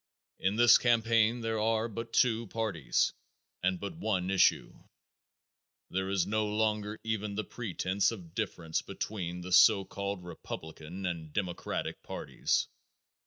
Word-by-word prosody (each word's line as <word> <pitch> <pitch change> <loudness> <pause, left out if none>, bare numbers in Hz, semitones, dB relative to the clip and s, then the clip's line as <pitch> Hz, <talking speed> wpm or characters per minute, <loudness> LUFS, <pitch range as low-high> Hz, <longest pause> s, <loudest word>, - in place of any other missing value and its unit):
In 95 +2 +1
this 120 +1 +7
campaign 115 0 +3
there 115 -1 -1
are 110 +1 +1
but 115 +1 -6
two 115 -2 +2
parties 100 - 0 0.5
and 95 -1 +1
but 100 - -5
one 95 -4 -1
issue. 95 -1 +3 1.2
There 95 +1 -1
is 95 -3 +1
no 110 +2 0
longer 105 0 -1
even 105 -2 -2
the 105 - -1
pretense 100 -4 -1
of 90 -8 -9
difference 85 -6 -2
between 90 -4 -4
the 90 +1 -7
so 95 +2 +7
called 100 -2 -4
Republican 85 +1 -7
and 85 -3 -4
Democratic 90 0 -3
parties. - - -1
100 Hz, 130 wpm, -31 LUFS, 90-110 Hz, 1.2 s, this